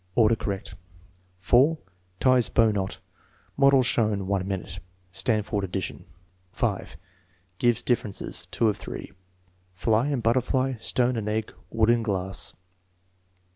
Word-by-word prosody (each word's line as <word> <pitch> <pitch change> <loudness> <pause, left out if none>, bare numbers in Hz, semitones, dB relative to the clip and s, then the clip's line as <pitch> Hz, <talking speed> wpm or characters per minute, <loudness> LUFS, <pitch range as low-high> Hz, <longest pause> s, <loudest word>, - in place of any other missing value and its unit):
Order 115 -1 +5
correct.) 100 -3 -4 0.6
4. 125 - +4 0.4
Tics 130 -2 +4
bow 115 -1 +4
knot. 95 -2 -3 0.6
(Model 140 -1 +5
shown. 105 -5 +1
1 95 -1 -1
minute.) 95 -1 -4 0.3
(Stanford 105 +1 0
ad 95 - -4
dition.) 95 0 -4 0.5
5. - - -2 0.6
Gives 120 -2 +2
differences. 115 -5 -2
(2 115 - +1
of 105 - +1
3.) - - -7 0.6
Fly 110 +6 +2
and 140 -5 -1
butterfly; 130 +3 +1
stone 125 +2 +1
and 105 -1 -2
egg; 110 0 -2 0.2
wood 115 0 +3
and 120 -1 +2
glass. 95 -3 -1
110 Hz, 125 wpm, -26 LUFS, 100-125 Hz, 0.6 s, Order